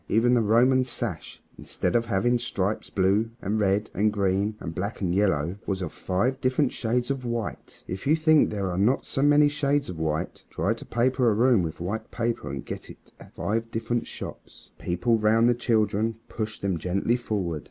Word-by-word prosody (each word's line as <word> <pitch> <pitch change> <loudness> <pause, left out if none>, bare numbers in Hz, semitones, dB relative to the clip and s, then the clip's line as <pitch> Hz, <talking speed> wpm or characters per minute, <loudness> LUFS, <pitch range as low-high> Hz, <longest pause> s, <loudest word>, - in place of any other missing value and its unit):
Even 120 +3 +3
the 120 - +4
Roman 125 +4 +4
sash, 125 -1 -5 0.2
instead - - -2
of 115 0 +2
having 120 +4 +2
stripes 105 -3 -2
blue 100 +4 +2
and 105 +1 -1
red 100 +2 +1
and 105 +1 +2
green 100 +1 0
and 80 - -6
black 100 +6 -4
and 90 -3 0
yellow, 90 -3 +1
was 95 -2 -1
of 90 -4 -5
five 120 +9 -1
different 130 +1 +2
shades 120 +3 -1
of 135 -2 -3
white. 120 -3 -5
If 95 +7 -5
you 155 - +5
think 155 -1 +4
there 100 -3 -2
are 90 - -2
not 120 +7 +2
so 135 - -2
many 145 +1 +5
shades 145 -1 0
of 85 - -6
white, 80 -1 -2
try - - 0
to - - -10
paper 125 +1 +2
a 105 - +2
room 120 -2 +4
with 80 -2 -4
white 105 +6 -4
paper 115 -1 -2
and - - -5
get - - -7
it - - -15
at - - -15
five 115 +2 -2
different 115 +1 -2
shops. - - -9
The - - -14
people 110 +7 +1
round 110 +2 +4
the 120 - +5
children 110 -2 0
pushed 110 -2 -5
them 95 -4 0
gently 95 +7 0
forward. 100 -9 -2
110 Hz, 200 wpm, -26 LUFS, 95-120 Hz, 0.2 s, you